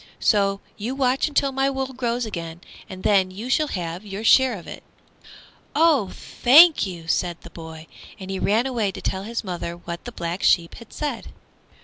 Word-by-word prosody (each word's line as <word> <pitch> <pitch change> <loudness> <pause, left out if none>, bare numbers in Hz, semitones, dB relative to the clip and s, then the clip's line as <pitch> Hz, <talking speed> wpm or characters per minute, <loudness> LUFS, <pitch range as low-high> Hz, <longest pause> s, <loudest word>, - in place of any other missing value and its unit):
So 195 -2 +2 0.2
you 235 +6 -4
watch 265 0 +1
until 280 -2 +1
my 270 +1 +1
wool 265 -1 -3
grows 245 -1 -2
again, 170 -5 -6 0.3
and 185 0 -9
then 195 -2 +3
you 215 +7 -6
shall 305 +2 +2
have 175 - -5
your 200 +1 -7
share 255 0 +5
of 170 - -12
it." - - -9 0.9
"Oh, 305 - +3
thank 300 - +5
you!" 170 -3 -8
said 170 +1 -1
the 170 - -13
boy, 160 -1 -10 0.3
and 190 0 -7
he 190 - -3
ran 220 +5 +2
away 230 -7 -1
to - - -7
tell 190 - -2
his 230 +1 -4
mother 175 -3 -5
what 170 0 -8
the 245 - -6
Black 170 -3 -4
Sheep 170 -1 +3
had 230 - -13
said. 285 -6 -4
210 Hz, 190 wpm, -23 LUFS, 175-260 Hz, 0.9 s, share